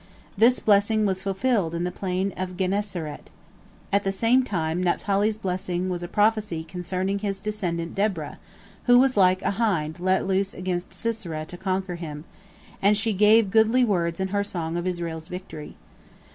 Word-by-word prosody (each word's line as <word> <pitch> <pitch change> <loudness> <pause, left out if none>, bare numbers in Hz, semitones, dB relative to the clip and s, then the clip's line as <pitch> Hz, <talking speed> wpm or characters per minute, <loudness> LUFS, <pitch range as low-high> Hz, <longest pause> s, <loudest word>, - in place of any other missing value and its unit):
This 235 +5 +5
blessing 210 +1 +3
was 190 -2 0
fulfilled 195 -2 0
in 170 - -2
the 180 - -1
plain 190 +1 -2
of 185 -1 -5
Gennesaret. 190 -5 -3 0.6
At 200 0 +3
the 195 - 0
same 230 +6 +3
time 175 -7 -2
Naphtali's 200 +4 +1
blessing 185 -2 -2
was 175 -1 -3
a 175 - -4
prophecy 210 -4 +1
concerning 185 +3 -3
his 200 -1 -3
descendant 180 -5 -3
Deborah, 195 -7 -2 0.5
who 245 0 +6
was 260 +1 +4
like 185 -1 +4
a - - +1
hind 170 -7 0
let 185 +1 +1
loose 195 +1 0
against 180 -1 -3
Sisera 180 -9 -4
to 175 - -9
conquer 185 -1 -2
him, 150 -3 -7 0.6
and 205 +1 +4
she 220 +1 0
gave 210 +1 +5
goodly 225 +4 +4
words 170 -5 0
in 190 0 -1
her 200 +1 0
song 170 -5 -4
of 175 +1 -2
Israel's 165 -3 -4
victory. 180 -5 -8
190 Hz, 165 wpm, -25 LUFS, 175-210 Hz, 0.6 s, who